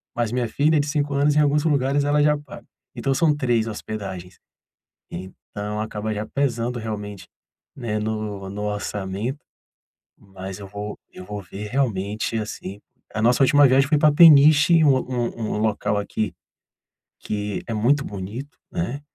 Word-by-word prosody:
Mas 120 -2 -1
minha 125 -1 0
filha 150 +1 +2
de 145 - -1
5 145 -1 -1
anos 145 +1 +3
em - - +4
alguns 150 0 +3
lugares 140 -2 +2
ela 145 0 +3
já 150 0 +3
paga. 145 -2 -12 0.3
Então 135 - 0
são 150 +2 +3
3 120 -5 +1
hospedagens, 100 -4 -6 0.7
então 100 +3 -6
acaba 110 0 -3
já 105 +1 -3
pesando 120 -2 -1
realmente, 105 -3 -6 0.5
né, 110 -5 -3
no 105 -2 -4
no 105 +1 -5
orçamento, 105 +4 -3 0.8
mas 95 0 -9
eu 100 - -8
vou 105 +1 -6
eu 90 - -10
vou 105 +1 -6
ver 100 +3 -8
realmente, 110 -4 -1
assim, 105 -2 -6 0.3
a 110 - -1
nossa 120 +3 +4
última 145 +2 +6
viagem 135 +1 +4
foi 150 -1 +3
pra 150 0 +5
Peniche 155 +1 +7
um 135 -3 +5 0.6
um - - -2
local 105 -1 0
aqui, 105 0 -3 0.9
que 105 -1 -3
é 115 - -2
muito 135 +7 +2
bonito, 110 - -7
né. 145 -6 -3
115 Hz, 155 wpm, -23 LUFS, 105-140 Hz, 0.9 s, Peniche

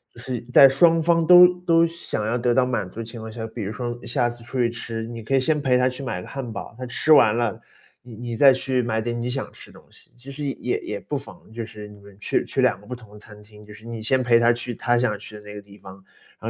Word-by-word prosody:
是 120 +1 -5
在 135 - +9
双 165 +5 +4
方 165 0 +2
都 180 +1 +9
都 165 -2 +3
想 165 -10 -4
要 115 +3 0
得 120 0 +1
到 130 0 +3
满 115 -7 -2
足 115 - -11
的 115 - -3
情 115 0 -9
况 110 0 -8
下， 110 0 -6
比 115 0 -7
如 100 - -4
说 120 +2 -5
下 120 0 0
次 120 0 -10
出 125 +2 -6
去 120 -1 +2
吃， 115 -1 -6
你 115 -1 -8
可 135 +5 -1
以 135 - +4
先 150 +3 +1
陪 130 -3 +2
他 125 +1 +2
去 130 +2 -8
买 125 -8 -4
个 - - -11
汉 130 -5 -6
堡， 105 - -8
他 130 - -5
吃 125 +5 -1
完 110 -8 +6
了， 115 -3 -1 0.4
你 125 - -12
你 120 0 -6
再 135 0 +7
去 130 -1 -1
买 110 -1 -1
点 120 +1 -3
你 120 +1 -3
想 135 +1 -4
吃 - - -15
的 - - -16
东 - - -26
西， - - -18
其 130 +3 -12
实 145 +2 -6
也 135 -2 -2
也 105 -1 -5
不 145 +7 -4
妨， 110 - -12
就 115 0 -6
是 105 -1 -10
你 105 - -15
们 100 -1 -16
去 - - -1
去 - - -2
两 - - +2
个 - - -19
不 125 - -6
同 110 -4 -16
的 105 - -13
餐 105 0 -14
厅， 105 0 -17
就 105 - -13
是 105 - -15
你 115 -1 -7
先 130 +3 +1
陪 120 -1 +4
他 120 0 +4
去 120 +1 -5
他 120 +3 +1
想 120 -4 0
去 105 - -11
的 105 - -10
那 105 0 -11
个 105 - -8
地 100 0 -17
方， 95 0 -12 0.4
然 - - -4
120 Hz, 315 characters per minute, -23 LUFS, 110-130 Hz, 0.4 s, 在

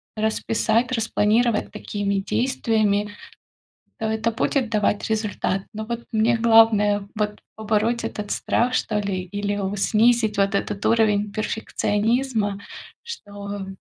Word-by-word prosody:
расписать, 220 +2 0
распланировать 225 0 +1
такими 205 -1 -3
действиями, 215 -3 0 0.9
то 220 - -4
это 220 +1 0
будет 235 +2 0
давать 210 -1 0
результат. 210 -3 -1
Но 215 +1 -5
вот 235 +1 -4
мне 225 +1 +3
главное 220 -3 +4
вот 210 -1 -2 0.2
побороть 220 +2 0
этот 210 -1 -5
страх, 250 +2 0
что 210 -4 0
ли, 195 -2 -2
или 205 +2 -3
о 195 0 -2
снизить 220 +1 +3
вот 200 +1 +2
этот 200 0 -2
уровень 210 -2 +2
перфекционизма, 215 0 -1 0.4
что, 205 - -7
215 Hz, 115 wpm, -23 LUFS, 205-225 Hz, 0.9 s, главное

